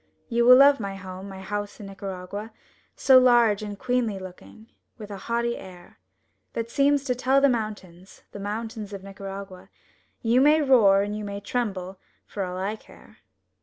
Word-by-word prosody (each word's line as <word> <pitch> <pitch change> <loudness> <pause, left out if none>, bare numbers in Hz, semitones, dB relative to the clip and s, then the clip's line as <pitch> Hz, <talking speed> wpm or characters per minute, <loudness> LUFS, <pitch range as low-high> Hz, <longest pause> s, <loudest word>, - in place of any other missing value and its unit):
You 235 0 +2
will 250 +1 +9
love 280 0 +6
my 200 -2 -4
home, 190 0 -9
my 190 -1 -9
house 205 +2 -5
in 210 - -8
Nicaragua, 195 +2 -7 0.4
So 265 -2 +6
large 240 -4 +4
and 205 -1 -6
queenly 245 -3 -1
looking, 190 +4 -12 0.3
with 210 -3 -9
a 200 - -6
haughty 235 0 0
air 180 -2 -13 0.5
That 230 0 -4
seems 280 +1 +2
to 260 -3 0
tell 260 +2 +2
the 280 - +5
mountains, 200 -6 -5
the 205 - -9
mountains 215 +1 -5
of 195 -1 -7
Nicaragua, 195 -1 -9 0.5
"You 240 +2 +3
may 300 +3 +5
roar 220 -9 +5
and 205 +1 -4
you 215 - -5
may 200 0 -5
tremble, 195 -4 -4 0.3
for 200 - -5
all 180 0 -5
I 200 +4 -3
care!" - - -18
210 Hz, 170 wpm, -25 LUFS, 195-240 Hz, 0.5 s, will